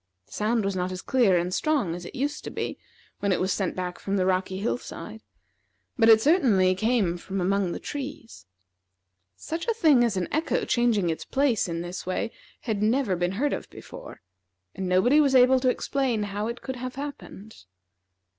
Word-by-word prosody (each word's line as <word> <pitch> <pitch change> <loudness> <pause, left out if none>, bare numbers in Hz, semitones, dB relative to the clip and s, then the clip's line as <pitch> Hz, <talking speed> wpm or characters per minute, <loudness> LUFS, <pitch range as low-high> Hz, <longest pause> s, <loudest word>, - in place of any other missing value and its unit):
The - - -30
sound 220 0 0
was 195 -1 -1
not 180 0 -2
as 185 0 -6
clear 230 -9 +3
and 175 +1 -1
strong 280 - 0
as 175 0 -7
it - - -9
used 290 +3 -2
to - - -4
be - - -4 0.4
when 200 - 0
it 185 - +1
was 185 0 +1
sent 190 -3 -2
back 180 -1 -4
from 200 0 -2
the 185 - +1
rocky 185 0 0
hill 225 +4 -1
side, 220 -2 -9 0.7
but 230 -3 +4
it 220 -1 +8
certainly 220 - +4
came 195 -4 0
from 195 +2 -4
among 190 0 +1
the - - -4
trees. 265 - -7 0.9
Such 325 - -5
a 460 - +1
thing 305 - +5
as 225 -5 0
an 180 - -1
echo 315 +2 0
changing 225 -8 +2
its 160 - -5
place 270 -7 +1
in 170 0 -3
this 175 +1 -6
way 185 +5 -2 0.3
had 215 -4 -2
never 220 -2 +2
been 175 +1 -1
heard 280 +8 0
of - - -5
before, - - -11 0.5
and 190 -1 -4
nobody 245 +12 +4
was 275 -3 +3
able 255 +1 +6
to 255 0 +2
explain 250 -4 0
how 205 +1 -3
it 235 +1 -6
could 260 -1 -5
have 255 +1 -6
happened. 220 - -9
215 Hz, 195 wpm, -26 LUFS, 185-260 Hz, 0.9 s, it